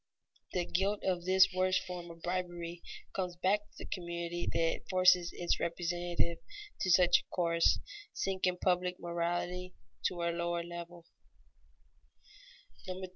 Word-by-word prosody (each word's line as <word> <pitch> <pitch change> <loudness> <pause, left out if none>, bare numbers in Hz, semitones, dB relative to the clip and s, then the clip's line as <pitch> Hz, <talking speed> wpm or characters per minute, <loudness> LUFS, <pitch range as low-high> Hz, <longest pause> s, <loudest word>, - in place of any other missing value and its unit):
The 180 -1 0
guilt 195 +4 0
of 180 -2 0
this 190 +1 +5
worst 185 0 +2
form 180 -2 -6
of 165 0 -12
bribery 175 -1 -3 0.3
comes 180 -2 -2
back 190 +4 +2
to 205 - -28
the - - -7
community 170 -1 -3
that 165 0 0
forces 185 -2 +5
its 175 - 0
representatives 170 0 -1 0.4
to 190 - 0
such 180 0 +6
a - - -16
course, 170 -2 +3 0.3
sinking 185 -1 0
public 180 -1 +2
morality 175 +1 -2 0.3
to 175 -1 -4
a 170 - +1
lower 170 0 -1
level. 170 0 -8
175 Hz, 130 wpm, -33 LUFS, 170-185 Hz, 0.4 s, such